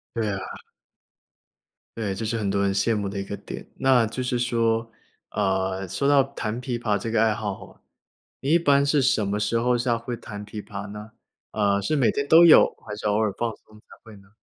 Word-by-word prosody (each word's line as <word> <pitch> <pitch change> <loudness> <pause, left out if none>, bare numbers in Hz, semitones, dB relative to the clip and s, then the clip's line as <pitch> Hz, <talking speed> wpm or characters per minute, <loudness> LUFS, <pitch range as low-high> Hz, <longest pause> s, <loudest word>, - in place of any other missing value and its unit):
对 110 -3 -1
啊。 95 - -3 1.6
对， 105 -4 -2
这 100 - -5
是 115 +1 -1
很 100 -3 -1
多 100 0 0
人 100 -1 +1
羡 115 +3 +1
慕 100 -2 -2
的 100 0 -5
一 - - -3
个 100 +1 -6
点。 - - -9
那 130 -3 +4
就 115 +4 -5
是 125 -1 -1
说， 115 -1 0 0.4
呃， 95 -1 -1
说 100 +10 -1
到 140 -2 +5
弹 120 -4 -5
琵 120 -1 -3
琶 105 -3 0
这 110 +3 -5
个 110 -1 +2
爱 110 -1 +3
好 105 -2 -4
吼， - - -15 0.6
你 140 +3 -2
一 170 - +5
般 140 -3 +3
是 145 -1 +2
什 125 -6 +2
么 105 +1 -1
时 115 +2 0
候 125 +1 +2
下 120 -1 0
会 120 +1 -5
弹 105 -2 -9
琵 105 0 -7
琶 100 0 -7
呢？ 105 +1 -9 0.4
呃。 100 -1 +1
是 155 +10 -1
每 130 -5 +3
天 140 0 -2
都 165 +3 +8
有， 165 - +8 0.2
还 105 -1 -6
是 105 - -4
偶 105 - +1
尔 110 -2 +1
放 120 -1 -1
松 105 0 -20
才 - - -29 0.2
会 110 -2 -13
呢？ 100 0 -20
110 Hz, 240 characters per minute, -24 LUFS, 100-125 Hz, 1.6 s, 都